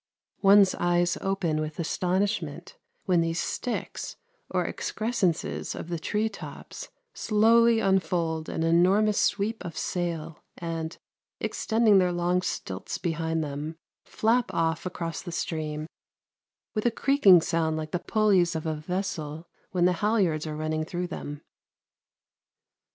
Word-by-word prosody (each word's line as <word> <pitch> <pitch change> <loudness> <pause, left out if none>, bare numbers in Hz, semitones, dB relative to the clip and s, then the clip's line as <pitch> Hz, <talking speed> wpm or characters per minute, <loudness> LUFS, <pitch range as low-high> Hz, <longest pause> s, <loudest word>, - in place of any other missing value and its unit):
One's 195 -1 +6
eyes 175 0 +1
open 180 -5 0
with 155 0 -5
astonishment 185 +5 -1 0.3
when 180 -3 +3
these 165 0 -1
sticks 245 - -3 0.3
or - - 0
excrescences 210 -7 -1
of 170 - -7
the 170 -1 -2
tree 210 +6 0
tops - - -9 0.2
slowly 230 +2 +4
unfold 175 -5 0
an 160 - -2
enormous 185 +6 +4
sweep 215 +3 0
of 165 - -7
sail 165 -3 -3 0.2
and, 165 -1 -4 0.4
extending 220 -3 +3
their 180 -1 +2
long 175 +1 +1
stilts 95 - -4
behind 165 -1 -1
them, 150 +2 -5 0.3
flap 235 +2 +1
off 165 +1 0
across 170 -2 -4
the 175 - -7
stream 155 -2 -3 0.9
with 215 +1 0
a - - +5
creaking 230 -6 +5
sound 160 -1 0
like 155 0 -5
the 180 - -1
pulleys 190 -5 +2
of 160 - -3
a 160 - 0
vessel 160 -1 -4 0.2
when 180 -2 +1
the 180 - +4
halliards 190 -8 +1
are 150 -1 -4
running 155 0 -1
through 175 +2 -3
them. 145 -4 -6
175 Hz, 130 wpm, -27 LUFS, 160-200 Hz, 0.9 s, One's